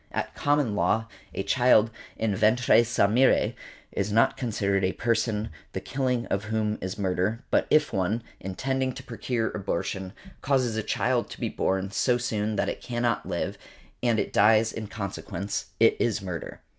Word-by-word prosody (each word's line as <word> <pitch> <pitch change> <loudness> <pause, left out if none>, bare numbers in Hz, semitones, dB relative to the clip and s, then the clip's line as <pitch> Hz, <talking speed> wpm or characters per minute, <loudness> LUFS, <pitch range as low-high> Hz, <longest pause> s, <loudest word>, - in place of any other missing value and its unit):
At - - -3
Common 145 -6 +1
Law 105 +4 +2 0.3
a 95 - -3
child 120 -3 +4 0.3
en 110 -3 +1
ventre 115 +4 +4
sa 115 -3 +2
mere 120 +6 +3 0.4
is 100 +1 -2
not 115 +2 +4
considered 100 -5 0
a 95 - +1
person 110 -2 0 0.2
the - - -2
killing 125 -3 -1
of 100 +2 -2
whom 110 0 -1
is 95 +2 -4
murder; 100 +4 -1
but - - +3
if 155 0 +3
one, 100 +5 0 0.2
intending 130 +7 -2
to 130 - -9
procure 115 -1 -2
abortion, 95 -1 -3 0.3
causes 130 -4 +1
a 110 - 0
child - - 0
to - - -9
be - - -1
born 95 +1 -1
so 120 +4 +2
soon 110 -3 -1
that - - 0
it - - -4
cannot 120 -2 -1
live, - - -3 0.4
and 120 -2 +2
|147| - - +3
it - - -12
dies 110 +2 +4
in 110 -1 -5
consequence, 100 -1 -4
it - - +5
is 115 -2 +1
murder. 90 -5 -6
110 Hz, 170 wpm, -27 LUFS, 100-120 Hz, 0.4 s, it